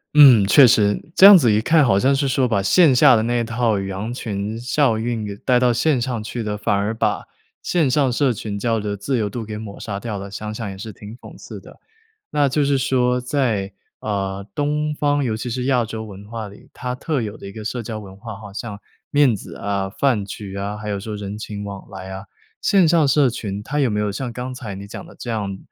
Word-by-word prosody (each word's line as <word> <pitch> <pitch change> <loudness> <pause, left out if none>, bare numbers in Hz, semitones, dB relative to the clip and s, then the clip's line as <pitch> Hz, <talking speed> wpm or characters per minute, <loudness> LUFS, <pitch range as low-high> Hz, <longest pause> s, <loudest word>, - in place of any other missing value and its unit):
嗯， 130 -9 +8
确 130 +5 +7
实， 105 -4 +3
这 190 - +8
样 200 -1 +11
子 120 -9 +3
一 105 - +2
看 155 +3 +4
好 95 -5 +3
像 130 +6 +3
是 140 +1 +1
说， 130 0 +1
把 105 -5 +1
线 140 - +5
下 125 0 +6
的 110 - +1
那 120 +1 0
一 115 - -1
套 115 -3 0
羊 95 +4 -4
群 110 -2 -4
效 125 -2 +1
应， 115 -1 -2
给 100 -1 -6
带 125 +2 +2
到 125 -1 +3
线 130 +2 +1
上 120 -3 -2
去 115 +2 -5
的， 105 -1 -3
反 105 - 0
而 100 +3 0
把 110 - -1 0.4
线 165 -6 +1
上 135 -1 +2
社 130 0 +2
群 100 -1 -5
交 115 0 0
流 105 -1 -3
的 100 - -4
自 125 +6 -1
由 105 -2 -1
度 115 +2 -5
给 105 0 -6
抹 105 -2 -8
杀 100 -2 -5
掉 110 -4 -4
了。 100 0 -7
想 105 +2 -6
想 110 -2 -5
也 95 - -8
是 110 +3 -7
挺 105 +2 -11
讽 - - -13
刺 - - -10
的。 - - -16 0.5
那 145 -2 +2
就 145 +2 +1
是 140 -1 +2
说 125 -1 +1
在， 120 -7 -1 0.3
呃， 100 -1 -3
东 150 +1 -1
方 145 -1 +1
尤 110 -3 -1
其 120 +2 -5
是 125 +1 -3
亚 125 -3 +2
洲 110 0 -6
文 100 -1 -10
化 115 -1 -5
里， 100 - -16
它 125 0 -4
特 140 +1 -2
有 110 -1 -5
的 100 - -10
一 - - -9
个 110 +1 -8
社 120 +2 -3
交 110 -1 -5
文 95 -2 -11
化， 110 0 -8
好 100 -1 -11
像 105 0 -6 0.3
面 145 -5 +4
子 95 - -9
啊、 100 -1 -2
饭 110 -2 +1
局 100 0 -8
啊， 100 +1 -4
还 105 0 -7
有 100 -1 -2
说 105 +1 -6
人 100 0 -6
情 105 -1 -6
往 100 -1 -8
来 95 -1 -8
啊 95 +2 -8 0.3
线 190 -4 +4
上 160 -3 +3
社 140 -1 +4
群 105 -4 -4
它 145 +7 -2
有 130 - +2
没 105 - -1
有 105 -1 -1
像 120 +2 -4
刚 125 +2 -5
才 105 -6 -7
你 100 +1 -8
讲 - - -8
的 - - -15
这 120 - -6
样， 100 -4 -3
110 Hz, 265 characters per minute, -21 LUFS, 100-130 Hz, 0.5 s, 样